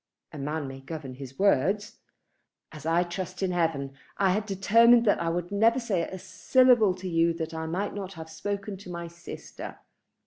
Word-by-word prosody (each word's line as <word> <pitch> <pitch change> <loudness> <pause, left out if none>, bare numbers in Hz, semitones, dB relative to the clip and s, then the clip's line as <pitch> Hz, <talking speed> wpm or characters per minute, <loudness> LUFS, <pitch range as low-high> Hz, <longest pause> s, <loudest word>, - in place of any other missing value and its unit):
"A 150 - -7
man 150 +1 -3
may 135 0 -8
govern 135 -1 -7
his 135 0 -10
words." 200 - +1 0.7
"As 155 0 -8
I 170 +2 +3
trust 185 +1 -5
in 185 - +1
heaven, 160 -6 0 0.2
I 195 -2 +3
had 210 +3 -1
determined 230 +5 +5
that 205 - +3
I 165 - 0
would 175 +2 -3
never 225 +5 +3
say 210 -8 0
a 190 +3 -5
syllable 215 +3 +4
to 185 0 -7
you 165 -1 +2
that 165 -1 -4
I 160 0 -4
might 190 +5 -2
not 195 -2 -6
have 160 -2 -8
spoken 200 +4 -4
to 185 -1 -12
my 170 -1 -5
sister. 170 +1 -9
180 Hz, 185 wpm, -27 LUFS, 160-200 Hz, 0.7 s, determined